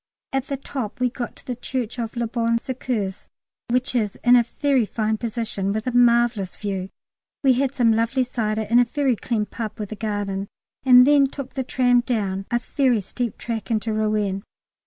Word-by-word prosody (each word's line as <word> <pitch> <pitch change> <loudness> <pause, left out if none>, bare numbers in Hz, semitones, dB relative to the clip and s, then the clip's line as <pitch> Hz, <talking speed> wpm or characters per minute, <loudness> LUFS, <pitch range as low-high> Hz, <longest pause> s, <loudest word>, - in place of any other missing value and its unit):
At 270 0 -1
the 275 - -2
top 260 -3 -5
we 250 -1 +1
got 240 -1 -5
to - - -17
the 250 - -3
Church 245 -1 -4
of 230 0 -4
Le 235 0 0
Bon 230 0 0
Secours, 230 -6 -3 0.4
which 250 +1 0
is 215 -5 0
in 245 0 +7
a 240 -1 +4
very 280 -4 +3
fine 215 0 -1
position 220 -4 -2
with 215 +1 -2
a 250 -1 -2
marvellous 235 -5 +3
view. 195 -2 -4 0.5
We 265 -2 +6
had 270 +1 0
some 235 -3 +4
lovely 230 +4 +1
cider 220 -3 -1
in 230 +3 +3
a 245 - +5
very 270 0 +1
clean 220 -1 -1
pub 215 +1 -6
with 210 -1 -5
a - - -4
garden, 205 -2 -3 0.4
and 250 -1 +8
then 285 -1 +5
took 270 -1 -8
the 265 - -2
tram 245 -1 +3
down 200 -6 -2
a 240 - +2
very 250 -1 +1
steep 230 +3 -4
track 230 -1 -4
into 220 -1 0
Rouen. 210 -2 0
235 Hz, 195 wpm, -23 LUFS, 215-250 Hz, 0.5 s, and